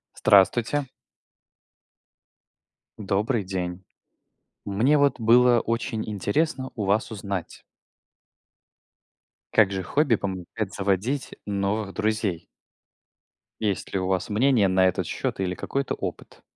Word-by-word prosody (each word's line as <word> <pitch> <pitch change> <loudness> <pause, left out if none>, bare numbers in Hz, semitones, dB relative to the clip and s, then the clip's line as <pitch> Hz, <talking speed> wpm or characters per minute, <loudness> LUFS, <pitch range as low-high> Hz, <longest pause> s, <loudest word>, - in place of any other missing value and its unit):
Здравствуйте! 115 +8 +3 2.1
Добрый 105 +2 0
день! 90 -1 -4 0.8
Мне, 115 +9 +3
вот, 140 -2 +2
было 120 +1 +5
очень 115 0 -2
интересно 130 - -1
у 110 - -3
вас 100 +4 +1
узнать 100 -4 -5 1.9
как 105 -3 +4
же 95 -1 -2
хобби 140 - +2
помогает 95 +1 -4
заводить 100 +8 -1
новых 100 0 -2
друзей? 105 -6 -1 1.2
Есть 105 -3 -2
ли 95 - +1
у 95 - -2
вас 95 -1 -1
мнение 110 -2 +3
на 95 0 +4
этот 90 - -1
счет - - -3
или 90 -1 -1
какой-то 135 +7 -3
опыт? - - -7
105 Hz, 105 wpm, -25 LUFS, 95-120 Hz, 2.1 s, было